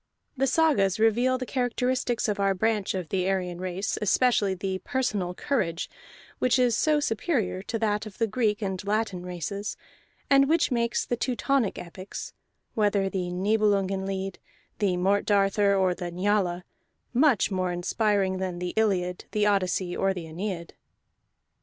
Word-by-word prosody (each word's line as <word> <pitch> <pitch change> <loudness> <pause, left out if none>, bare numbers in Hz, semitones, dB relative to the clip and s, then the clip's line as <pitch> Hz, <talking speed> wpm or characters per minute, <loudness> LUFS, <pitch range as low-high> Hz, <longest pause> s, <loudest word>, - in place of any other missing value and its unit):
The 270 0 +1
sagas 255 - +3
reveal 240 +4 +3
the 255 - -4
characteristics 250 -1 0
of 210 -1 -1
our 195 -1 +2
branch 210 0 0
of 180 -4 -4
the 185 -1 0
Aryan 180 -2 -2
race, 185 +2 -2
especially 210 -2 +2
the 190 0 -3
personal 210 -9 -2
courage 175 -12 -1 0.5
which 255 0 +3
is 245 -3 +3
so 305 +4 +3
superior 225 - -1
to 225 +3 -3
that 215 -1 0
of 205 - -12
the 230 - +2
Greek 220 -2 0
and 190 -1 -3
Latin 205 -3 -1
races, 180 +3 -4 0.5
and 275 0 +5
which 325 -2 +3
makes 235 -1 0
the 240 - -1
Teutonic 245 -1 0
epics 185 +2 -8 0.4
(whether 205 -3 +1
the 180 -2 -2
Niebelungen 195 0 +1
Lied, 195 -1 -4 0.4
the 195 -4 +1
Morte 195 +3 +2
Darthur, 200 0 +3
or 190 -2 +2
the 175 -1 -5
Njala) 180 -1 0 0.5
much 250 -6 +3
more 185 -1 0
inspiring 190 +1 0
than 185 -2 -3
the 180 0 -4
Iliad, 185 -5 0
the 210 -1 +2
Odyssey, 185 -3 +1
or 195 0 +1
the 175 -3 -5
Aeneid. 170 +1 -5
200 Hz, 155 wpm, -27 LUFS, 185-225 Hz, 0.5 s, and